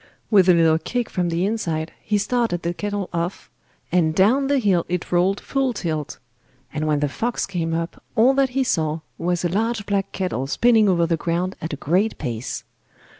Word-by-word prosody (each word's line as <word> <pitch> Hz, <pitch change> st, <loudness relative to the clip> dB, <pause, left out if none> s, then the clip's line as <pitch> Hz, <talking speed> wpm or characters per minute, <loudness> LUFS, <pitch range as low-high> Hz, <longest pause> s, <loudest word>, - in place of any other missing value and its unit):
With 190 Hz, -3 st, +6 dB
a 180 Hz, -, +7 dB
little 160 Hz, -1 st, +4 dB
kick 240 Hz, +8 st, -3 dB
from 180 Hz, -1 st, 0 dB
the 170 Hz, +2 st, 0 dB
inside 165 Hz, -7 st, -2 dB
he 210 Hz, -, 0 dB
started 225 Hz, -5 st, 0 dB
the 170 Hz, +1 st, -1 dB
kettle 205 Hz, 0 st, -3 dB
off, 170 Hz, +2 st, -3 dB, 0.4 s
and 160 Hz, -3 st, +2 dB
down 245 Hz, +10 st, +4 dB
the 285 Hz, 0 st, +2 dB
hill 195 Hz, -8 st, +2 dB
it 180 Hz, -1 st, -3 dB
rolled 180 Hz, +3 st, +2 dB
full 270 Hz, -2 st, -1 dB
tilt; 160 Hz, -7 st, -3 dB, 0.6 s
and 155 Hz, 0 st, -2 dB
when 150 Hz, -1 st, +1 dB
the 145 Hz, -, +2 dB
fox 235 Hz, -, -2 dB
came 165 Hz, -4 st, -2 dB
up, 165 Hz, +1 st, -4 dB
all 245 Hz, +4 st, +5 dB
that 270 Hz, -1 st, +2 dB
he 270 Hz, -, +4 dB
saw 160 Hz, -8 st, 0 dB, 0.2 s
was 175 Hz, +1 st, 0 dB
a -, -, +2 dB
large 220 Hz, +3 st, -1 dB
black 200 Hz, -1 st, -1 dB
kettle 180 Hz, -8 st, -2 dB
spinning 220 Hz, -, +4 dB
over 170 Hz, -2 st, +3 dB
the 165 Hz, 0 st, 0 dB
ground 175 Hz, +4 st, -1 dB
at 160 Hz, -, -4 dB
a -, -, -1 dB
great 180 Hz, +10 st, 0 dB
pace. 115 Hz, -1 st, -4 dB
180 Hz, 195 wpm, -22 LUFS, 165-215 Hz, 0.6 s, a